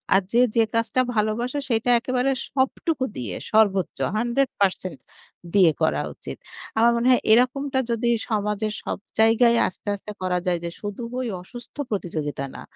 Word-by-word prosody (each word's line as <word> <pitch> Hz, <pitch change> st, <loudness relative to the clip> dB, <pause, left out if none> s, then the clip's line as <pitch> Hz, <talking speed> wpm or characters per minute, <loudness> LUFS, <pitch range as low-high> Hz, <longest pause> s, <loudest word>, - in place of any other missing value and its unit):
আর 195 Hz, -, +5 dB
যে, 240 Hz, -, +5 dB
যে, 230 Hz, -, +5 dB
কাজটা 230 Hz, +3 st, +2 dB
ভালোবাসে 235 Hz, +6 st, 0 dB
সেটা 230 Hz, +1 st, +1 dB
একেবারে 255 Hz, +2 st, 0 dB, 0.2 s
সবটুকু 265 Hz, +2 st, -1 dB
দিয়ে 110 Hz, -8 st, -4 dB, 0.2 s
সর্বোচ্চ 200 Hz, -5 st, +2 dB, 0.2 s
100% 225 Hz, -7 st, 0 dB, 0.6 s
দিয়ে 185 Hz, -5 st, +6 dB
করা 160 Hz, -, +2 dB
উচিত। -, -, -8 dB, 0.4 s
আমার 235 Hz, +1 st, +5 dB
মনে 235 Hz, +2 st, +1 dB
হয় 250 Hz, -, +4 dB
এরকমটা 265 Hz, +3 st, +3 dB
যদি 235 Hz, +1 st, 0 dB, 0.2 s
সমাজের 210 Hz, 0 st, -1 dB
সব -, -, -3 dB, 0.2 s
জায়গায় 230 Hz, +1 st, +5 dB
আস্তে, 185 Hz, -, -10 dB
আস্তে 205 Hz, +1 st, -8 dB
করা 180 Hz, -1 st, 0 dB
যায় 175 Hz, -1 st, +1 dB
যে, -, -, -2 dB
শুধু 205 Hz, +3 st, -5 dB, 0.2 s
ওই 255 Hz, -, -2 dB
অসুস্থ 240 Hz, +6 st, -12 dB
প্রতিযোগিতা 155 Hz, -, -3 dB
না। -, -, -8 dB
225 Hz, 150 wpm, -24 LUFS, 195-245 Hz, 0.6 s, দিয়ে